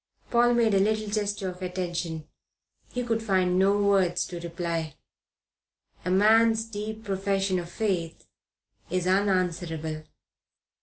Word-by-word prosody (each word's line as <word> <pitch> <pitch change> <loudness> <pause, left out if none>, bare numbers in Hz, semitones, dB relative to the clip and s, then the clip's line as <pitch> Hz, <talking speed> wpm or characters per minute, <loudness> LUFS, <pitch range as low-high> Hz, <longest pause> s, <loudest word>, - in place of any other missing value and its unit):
Paul 240 0 +4
made 230 -3 +3
a 195 - +4
little 215 +1 +1
gesture 205 -2 -1
of 180 0 -10
attention. 175 -3 -3 0.6
He 245 - -2
could 225 -2 -1
find 185 -4 +2
no 200 +2 +4
words 190 -3 +2
to 175 - -7
reply. 170 -3 -3 1.1
A 180 - -2
man's 220 +3 +4
deep 220 0 -6
profession 195 -1 0
of 170 -1 -7
faith 175 -5 -2 0.6
is 180 +1 -1
unanswerable. 175 -5 0
190 Hz, 120 wpm, -27 LUFS, 175-210 Hz, 1.1 s, Paul